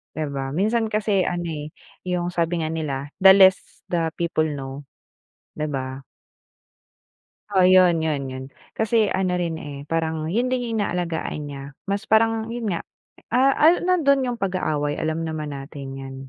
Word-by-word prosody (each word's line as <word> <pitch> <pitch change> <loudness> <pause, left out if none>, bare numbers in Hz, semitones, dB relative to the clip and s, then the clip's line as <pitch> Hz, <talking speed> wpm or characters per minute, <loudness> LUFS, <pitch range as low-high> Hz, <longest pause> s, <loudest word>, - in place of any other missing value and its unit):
Di 155 -1 -2
ba, 135 -1 -4
minsan 220 +7 0
kasi 205 -3 +1
ano 175 0 -2
eh, 155 -2 -5 0.3
yung 180 -1 -1
sabi 170 0 0
nga 160 - -1
nila, 150 -4 -3 0.2
the 190 - +11
less 190 -1 +5
the 165 -2 0
people 170 -2 +1
know, 140 -2 -5 0.7
di 155 - -1
ba? 135 -2 -4 1.5
Oo, 190 -3 +4
yun-yun-yun. 160 -8 +2 0.2
Kasi 220 -1 +2
ano 185 -1 0
rin 170 -2 -2
eh, 145 -2 -7
parang 160 -1 -1
yun 235 +8 +1
din 255 -1 +1
yung 225 - -1
inaalagaan 170 -5 -2
niya, 140 -1 -7 0.3
mas 200 +2 -1
parang 225 0 +3
yun 235 -3 -3
nga, 170 - -2 0.5
ah, 260 +2 +5
ah, 325 +3 +6
nandun 285 -7 +3
yung 245 -1 -2
pag-aaway, 155 -7 -1
alam 160 +1 -1
naman 155 -2 -4
natin 140 0 -8
yan. 135 0 -8
170 Hz, 155 wpm, -23 LUFS, 150-205 Hz, 1.5 s, the